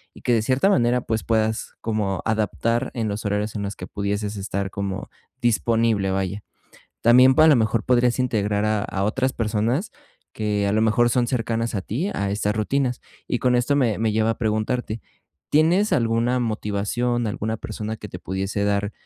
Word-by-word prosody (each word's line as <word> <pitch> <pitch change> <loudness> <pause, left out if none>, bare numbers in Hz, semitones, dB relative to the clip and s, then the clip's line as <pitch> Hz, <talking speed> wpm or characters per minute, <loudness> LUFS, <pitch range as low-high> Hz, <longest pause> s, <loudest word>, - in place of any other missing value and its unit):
y - - -14
que 120 - +1
de 115 - +3
cierta 130 - +2
manera, 125 -8 +3
pues 110 -2 -2
puedas 110 -1 -1
como 105 -4 -1
adaptar 115 +3 0
en 115 -2 -1
los 105 +1 -3
horarios 105 +1 -2
en 100 - -3
los 100 0 -4
que - - -7
pudieses 100 +1 -3
estar 100 -1 -3
como 100 -1 -4 0.3
disponible, 115 -2 +2
vaya. 95 +1 -2 0.6
También 125 +3 +7
a 155 - +8
lo 155 - +7
mejor 110 0 +1
podrías 125 0 +2
integrar 105 -4 0
a 110 -1 +1
a 95 0 -2
otras 130 +5 0
personas, 115 - -1 0.4
que 105 -2 -1
a 100 - +1
lo 110 - +2
mejor 115 +2 +3
son 120 +1 +1
cercanas 115 -2 -1
a 100 - 0
ti, 150 - -2
a 100 -1 -2
estas 105 +1 -1
rutinas. 125 +3 0 0.3
Y 125 - 0 0.2
esto 125 +4 +1
me 120 -7 +2
me 110 -1 +1
lleva 110 +1 +2
a - - -3
preguntarte, 110 +1 -1 0.5
¿tienes 170 +8 +3
alguna 115 +2 +1
motivación, 115 +2 -1
alguna 110 +2 -3
persona 110 +1 -5
que 105 - -9
te 90 - -8
pudiese 95 +2 -2
dar 100 0 0
110 Hz, 180 wpm, -23 LUFS, 105-120 Hz, 0.6 s, a